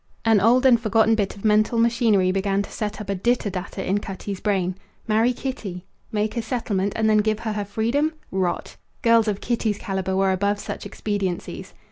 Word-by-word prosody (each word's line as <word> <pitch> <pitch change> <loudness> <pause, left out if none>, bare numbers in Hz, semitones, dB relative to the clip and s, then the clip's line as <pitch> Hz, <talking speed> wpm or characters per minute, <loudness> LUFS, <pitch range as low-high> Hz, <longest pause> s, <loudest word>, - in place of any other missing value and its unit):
An 225 -2 +5
old 245 +5 +4
and 245 -3 +6
forgotten 225 0 +3
bit 205 -3 0
of 200 - -10
mental 215 +2 +3
machinery 230 -5 +3
began 195 +1 0
to - - -11
set 210 0 -4
up 210 - -7
a - - -1
ditter 230 +1 0
datter 190 +1 -5
in 195 +2 +1
Cutty's 195 -1 -6
brain. 190 -3 0 0.3
Marry 225 +3 +3
Kitty? 220 -9 -5 0.3
Make 210 0 -1
a 235 - 0
settlement, 210 -4 -1
and 220 0 +1
then 215 -1 +4
give 215 0 0
her 220 -2 -2
her 205 -1 -3
freedom? 235 +10 0 0.2
Rot! 185 -2 -2 0.3
Girls 230 -2 +5
of 205 -2 -1
Kitty's 225 -3 -1
calibre 190 -1 -2
were 195 0 +3
above 200 +2 +1
such - - -6
expediencies. 200 -4 -4
210 Hz, 190 wpm, -23 LUFS, 195-225 Hz, 0.3 s, and